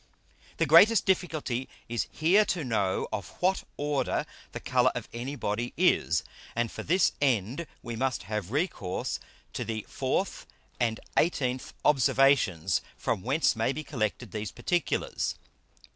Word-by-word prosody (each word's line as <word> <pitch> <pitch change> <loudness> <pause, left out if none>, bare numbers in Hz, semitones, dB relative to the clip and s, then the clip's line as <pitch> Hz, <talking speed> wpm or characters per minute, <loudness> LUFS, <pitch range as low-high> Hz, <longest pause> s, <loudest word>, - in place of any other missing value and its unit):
The 165 - +2
greatest 185 +8 +7
difficulty 155 -9 0 0.2
is 120 0 -2
here 180 +7 +4
to 175 -5 -1
know 100 -7 0
of 100 -2 -3
what 190 +1 +2
Order 145 -1 0 0.3
the - - -5
Colour - - +3
of - - -4
any 125 +5 -4
Body 120 -1 -2
is. - - +3 0.3
And 120 -1 0
for - - -6
this 180 +3 +3
end 130 - +1 0.2
we 120 -1 -5
must 130 -2 -1
have 105 -1 -3
recourse 135 - -2 0.3
to - - -2
the 110 -2 -4
4th - - -2 0.3
and 115 -2 +1 0.2
18th 130 -6 +1
Observations; 130 - +3 0.2
from - - -1
whence 135 - +2
may 115 +3 +1
be 155 +3 -5
collected 115 -5 -3
these 105 -3 -4
particulars. 175 - -1
130 Hz, 140 wpm, -28 LUFS, 110-155 Hz, 0.3 s, greatest